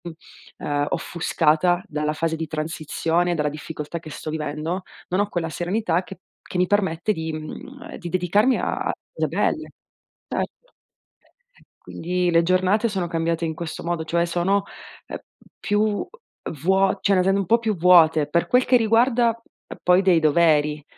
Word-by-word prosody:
Mh - - -4 0.5
uhm, 145 0 -1
offuscata 175 +1 +1
dalla 150 -2 -2
fase 160 +1 -1
di 160 0 -4
transizione, 160 +3 -1
dalla 150 -2 0
difficoltà 150 +2 -6
che 155 - -11
sto 155 +1 -6
vivendo, 155 +4 -3 0.3
non 185 - 0
ho 205 0 +1
quella 170 -4 -2
serenità 175 +1 -1
che 185 -1 -11 0.3
che - - -3
mi 180 0 +2
permette 195 -1 +1
di, 160 -3 -4
mhmm, 160 - -8
ehm, - - -7
di 175 -4 -7
dedicarmi 185 +8 +2
a - - -2
a - - +1 0.2
cose - - -1
belle. - - -1 0.6
Certo. - - -5 1.1
Quindi, 180 +1 -2
le 170 0 +4
giornate 185 +5 +2
sono 190 -5 -2
cambiate 165 0 -1
in 160 -1 -2
questo 170 -1 -6
modo, 170 -1 -2
cioè 170 +2 0
sono, 180 +4 +1 0.4
ehm, - - -5 0.4
più 205 0 0 0.5
vuo 190 +3 +2
cioè 200 - +3
le 185 - +3
sento 195 +1 +2
un 195 - -1
po' 230 - +5
più 225 -3 -1
vuote, 160 -4 +5
per 170 - +1
quel 250 +1 +3
che 250 - +5
riguarda 235 +1 +3
p 230 +1 -15
poi 180 +2 +4
dei 180 -3 +4
doveri. 150 -1 +3
175 Hz, 165 wpm, -23 LUFS, 160-195 Hz, 1.1 s, po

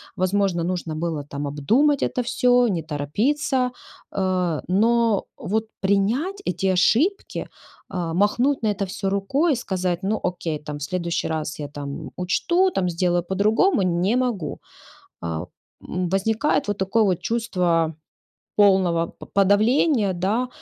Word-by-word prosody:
возможно, 185 -2 +1
нужно 175 -2 -3
было, 160 -2 -2
там, 145 0 -5
обдумать 235 - +2
это 250 - 0
всё, 245 0 +3
не 175 -5 -1
торопиться". 250 - 0 0.4
Э, 185 -4 0
но, 225 +2 +3
вот, 220 +3 -1 0.2
принять 225 - +1
эти 190 -1 +1
ошибки, 300 - +1 0.4
а, 175 -4 -3
махнуть 235 +9 +2
на 215 - +2
это 205 -1 -3
всё 195 0 -3
рукой 265 - +1
и - - 0
сказать: 185 -6 -2
"Ну, 210 +2 0
окей, 175 -3 -2
там, 150 0 -6
в 145 - -7
следующий 170 +2 -2
раз 155 -1 -3
я, 145 - -4
там, 140 -1 -7
учту, 345 - +2
там, 185 - 0
сделаю 175 0 +1
по-другому"- 210 - +2
не 180 +4 +1
могу. 220 - -2 0.6
Э, 85 0 -3 0.4
м, 180 0 -2
возникает 220 +8 +1
вот 205 -1 -1
такое 195 +4 +2
вот 185 -4 +1
чувство 180 -8 0 0.6
полного 185 -5 +4
по - - -9
подавления, 210 - +3
да. 200 +8 0
195 Hz, 140 wpm, -23 LUFS, 170-230 Hz, 0.6 s, полного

